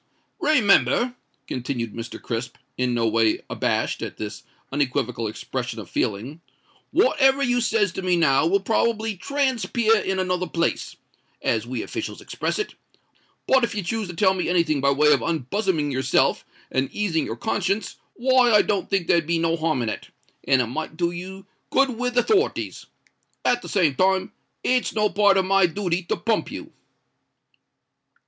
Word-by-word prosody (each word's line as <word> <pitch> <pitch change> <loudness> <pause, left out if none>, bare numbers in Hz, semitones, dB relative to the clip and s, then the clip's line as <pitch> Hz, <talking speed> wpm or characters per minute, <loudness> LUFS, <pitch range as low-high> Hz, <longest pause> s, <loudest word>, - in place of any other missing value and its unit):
"Remember," 245 -2 +3 0.3
continued 120 -3 -4
Mr. 115 +1 -7
Crisp, 120 +1 -5 0.2
in 125 -1 0
no 115 -1 +1
way 110 0 +2
abashed - - -1
at - - -6
this 105 -1 -6 0.3
unequivocal 125 -4 -1
expression 105 - -5
of - - -10
feeling, 120 +11 -2 0.5
"whatever 280 - +3
you 245 -1 +2
says 220 -4 +2
to 190 - -5
me 180 -1 +2
now 150 -3 +3
will 195 +3 +2
probably 220 +1 0
trans 265 +3 -1
peer 225 -2 +3
in 190 -1 -2
another 185 -1 -1
place, 170 +1 -2 0.5
as 115 0 0
we 125 -2 -3
officials 335 - -5
express - - -3
it; 420 - -3 0.7
but 265 -1 +4
if 235 - -1
you 205 - -2
choose 215 +4 -2
to 175 - -8
tell 190 +1 +3
me 180 -2 -2
anything 165 -5 +2
by 140 - +3
way 150 +2 +4
of - - +2
unbuzziming 160 - -1
yourself 130 0 +1 0.3
and 130 +1 0
easing 185 -6 -1
your 115 - -5
conscience, 195 - -1 0.2
why, 255 -1 +4
I 210 - +6
don't 200 -3 -1
think 195 -3 +1
there'd 170 -2 +2
be 170 0 +1
no 165 0 +1
harm 160 -6 0
in 110 - -1
it, - - -6 0.4
and 130 -2 +4
it - - -3
might 155 +6 -5
do 170 -1 +1
you 190 +3 -8 0.2
good 275 0 +3
with 245 +1 -3
the 245 - +4
'thorities. 425 0 0 0.6
At 245 0 +2
the - - -9
same 170 -8 +2
time 190 +5 +1 0.3
it's 255 0 +1
no 210 -1 +2
part 200 -1 +4
of 190 - +2
my 195 -1 +4
dooty 180 0 -1
to - - 0
pump 225 -1 0
you." - - -8
180 Hz, 170 wpm, -23 LUFS, 140-220 Hz, 0.7 s, I